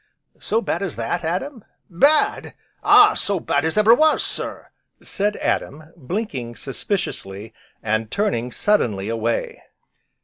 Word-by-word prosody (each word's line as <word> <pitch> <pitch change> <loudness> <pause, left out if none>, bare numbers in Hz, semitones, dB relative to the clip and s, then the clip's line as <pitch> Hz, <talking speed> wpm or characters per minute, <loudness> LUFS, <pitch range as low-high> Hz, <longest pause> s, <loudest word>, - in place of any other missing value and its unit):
"So 225 +2 -1
bad - - -2
as 190 -7 -3
that, 115 +10 -3
Adam?" 195 - -3 0.2
"Bad! 285 - +2 0.3
ah, - - +7
so 200 -2 0
bad 145 -2 0
as 160 +5 -1
ever 215 +2 +6
was, 310 +4 +3
sir!" - - -3 0.3
said 205 +1 -1
Adam, 155 +3 -3
blinking 145 - -5
suspiciously, 120 - -5 0.3
and 110 0 -1
turning 125 - -1
suddenly 110 - 0
away. 115 0 -2
170 Hz, 125 wpm, -21 LUFS, -, 0.3 s, ah